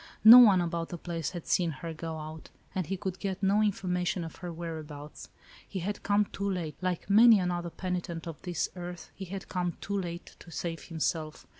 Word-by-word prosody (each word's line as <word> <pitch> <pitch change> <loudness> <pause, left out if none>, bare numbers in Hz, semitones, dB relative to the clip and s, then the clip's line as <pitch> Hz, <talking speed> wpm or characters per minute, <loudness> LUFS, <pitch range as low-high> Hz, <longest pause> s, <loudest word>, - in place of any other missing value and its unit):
No 230 +3 +12
one 205 -7 +7
about 170 -1 -2
the 175 - -5
place 165 -1 -3
had 175 -3 -7
seen 175 -2 +2
her 160 +3 -6
go 160 0 -5
out, 155 0 -8 0.2
and 185 -4 -2
he 195 +2 -2
could 190 -1 -4
get 195 -1 -3
no 200 +2 +4
information 180 -3 0
of 165 - -8
her 180 -1 -6
whereabouts. 155 -3 -7 0.4
He 195 - -5
had 205 +4 -3
come 205 +1 +2
too 200 0 -3
late; 170 -5 -3
like 180 -2 -2
many 220 +3 +8
another 175 -1 -1
penitent 175 -2 -4
of 165 -3 -7
this 175 -3 -1
earth, 175 -1 -7
he 195 - -7
had 190 +1 -7
come 175 -2 -2
too 200 - -4
late, 170 -1 -7
to - - -13
save 165 +1 -4
himself. 160 -1 -3
175 Hz, 200 wpm, -30 LUFS, 165-190 Hz, 0.4 s, No